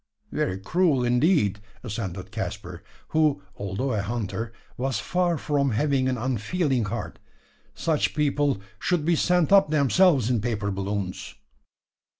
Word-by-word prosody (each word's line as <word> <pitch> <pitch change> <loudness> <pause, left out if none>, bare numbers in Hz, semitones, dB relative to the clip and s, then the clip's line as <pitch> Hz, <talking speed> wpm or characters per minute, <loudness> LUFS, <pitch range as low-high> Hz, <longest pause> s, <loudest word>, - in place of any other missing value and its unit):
"Very 95 0 -1
cruel 150 - +2
indeed!" 120 - +2 0.2
assented 95 -5 -5
Caspar, - - -5 0.3
who, 155 -9 +2
although 100 +7 -2
a 105 - 0
hunter, 115 +1 -3 0.2
was 130 -2 -1
far 175 +5 0
from 140 -4 0
having 135 +1 +1
an 130 - -1
unfeeling 130 - 0
heart. 115 +4 -5 0.6
"Such 155 -3 0
people 145 -5 +1 0.2
should 175 -5 0
be 170 0 +3
sent 180 +1 +2
up 195 -6 +6
themselves 150 - +4
in 120 -3 +1
paper 105 -3 -1
balloons." 100 -1 -4
130 Hz, 130 wpm, -25 LUFS, 105-155 Hz, 0.6 s, up